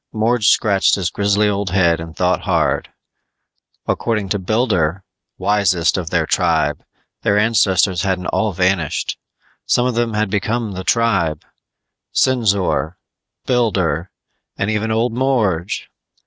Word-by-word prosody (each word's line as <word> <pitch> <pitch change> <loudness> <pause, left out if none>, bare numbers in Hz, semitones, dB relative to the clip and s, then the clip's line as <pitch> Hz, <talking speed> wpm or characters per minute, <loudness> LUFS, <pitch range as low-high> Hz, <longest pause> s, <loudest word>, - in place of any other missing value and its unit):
Morge 110 0 +1
scratched 100 -2 +3
his 95 -3 -2
grizzly 100 +1 +1
old 100 -1 -1
head 85 -3 +2
and 80 0 -8
thought 90 0 +1
hard. - - 0 1.0
According 105 -4 -1
to 100 - 0
Builder, 95 -4 0 0.3
wisest 95 -3 +1
of 90 -4 -3
their 85 -2 +1
tribe, 80 -3 0 0.4
their 100 - +2
ancestors 95 -4 +2
hadn't 95 -1 -1
all 110 -2 0
vanished; 90 -3 -1 0.5
some 120 - +2
of 125 - 0
them 115 -1 -1
had 105 -2 0
become 110 +2 -1
the 95 -1 -6
tribe 95 -10 +1 0.7
Sinzor, 100 -9 +1 0.5
Builder, 95 - 0 0.5
and 100 +3 -1
even 110 +1 -1
old 115 +1 0
Morge. 110 -9 0
100 Hz, 125 wpm, -18 LUFS, 90-110 Hz, 1.0 s, scratched